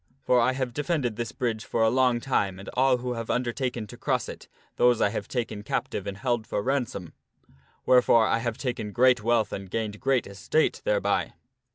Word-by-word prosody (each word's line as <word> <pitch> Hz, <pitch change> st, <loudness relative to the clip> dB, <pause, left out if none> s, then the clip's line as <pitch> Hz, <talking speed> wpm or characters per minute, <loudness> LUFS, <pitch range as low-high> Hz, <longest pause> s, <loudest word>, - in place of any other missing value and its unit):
For 125 Hz, -, +3 dB
I 130 Hz, +2 st, +2 dB
have 130 Hz, -2 st, -3 dB
defended 145 Hz, -5 st, -1 dB
this 115 Hz, 0 st, -4 dB
bridge 115 Hz, -4 st, -2 dB
for 115 Hz, -, 0 dB
a 110 Hz, -, +5 dB
long 125 Hz, -2 st, +3 dB
time 100 Hz, -7 st, 0 dB
and 100 Hz, -, -11 dB
all 130 Hz, 0 st, +3 dB
who 125 Hz, 0 st, -3 dB
have 115 Hz, -1 st, -5 dB
undertaken 125 Hz, -1 st, -1 dB
to 105 Hz, -, -12 dB
cross -, -, -1 dB
it, -, -, -9 dB, 0.3 s
those 125 Hz, -1 st, +4 dB
have 105 Hz, +1 st, 0 dB
I -, -, -23 dB
taken 115 Hz, -4 st, -3 dB
captive 100 Hz, -1 st, -3 dB
and 100 Hz, -1 st, -4 dB
held 120 Hz, -1 st, -1 dB
for 100 Hz, -, -2 dB
ransom. 125 Hz, -, -2 dB, 0.7 s
Wherefore 120 Hz, -3 st, +5 dB
I 115 Hz, -, +1 dB
have 120 Hz, -1 st, -3 dB
taken 120 Hz, -6 st, -4 dB
great 125 Hz, 0 st, +4 dB
wealth 115 Hz, -2 st, +1 dB
and 95 Hz, -1 st, -6 dB
gained 105 Hz, 0 st, -3 dB
great 135 Hz, -3 st, +1 dB
estate 100 Hz, +10 st, 0 dB
thereby." -, -, +1 dB
120 Hz, 195 wpm, -26 LUFS, 110-130 Hz, 0.7 s, a